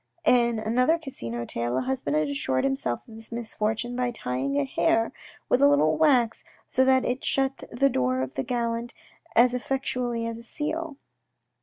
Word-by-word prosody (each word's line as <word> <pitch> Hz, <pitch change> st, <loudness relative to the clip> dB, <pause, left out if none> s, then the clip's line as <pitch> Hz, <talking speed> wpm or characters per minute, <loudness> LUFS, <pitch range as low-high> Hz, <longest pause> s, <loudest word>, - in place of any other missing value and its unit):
In 235 Hz, -4 st, +4 dB
another 250 Hz, +8 st, +2 dB
Casino 120 Hz, -, -5 dB
tale 120 Hz, +2 st, -2 dB
a -, -, +1 dB
husband 130 Hz, +3 st, -2 dB
had 155 Hz, 0 st, +2 dB
assured 135 Hz, -2 st, 0 dB
himself 135 Hz, -3 st, -1 dB
of 225 Hz, -, -13 dB
his 225 Hz, +1 st, -7 dB
misfortune 230 Hz, +1 st, -2 dB
by 250 Hz, 0 st, 0 dB
tying 140 Hz, -, -2 dB
a 140 Hz, -, +2 dB
hair 225 Hz, -, +1 dB, 0.3 s
with 250 Hz, -, +2 dB
a 280 Hz, -, +7 dB
little 285 Hz, 0 st, +4 dB
wax 255 Hz, -8 st, +3 dB, 0.2 s
so 260 Hz, -, +3 dB
that 260 Hz, 0 st, +4 dB
it 250 Hz, +2 st, -2 dB
shut 270 Hz, 0 st, +1 dB
the 275 Hz, +4 st, +3 dB
door 130 Hz, -, 0 dB
of 130 Hz, -, -6 dB
the -, -, -2 dB
gallant 235 Hz, -, -2 dB, 0.4 s
as 245 Hz, +2 st, +5 dB
effectually 250 Hz, -2 st, -2 dB
as 230 Hz, 0 st, -4 dB
a -, -, -12 dB
seal. 310 Hz, +4 st, -4 dB
235 Hz, 175 wpm, -26 LUFS, -, 0.4 s, a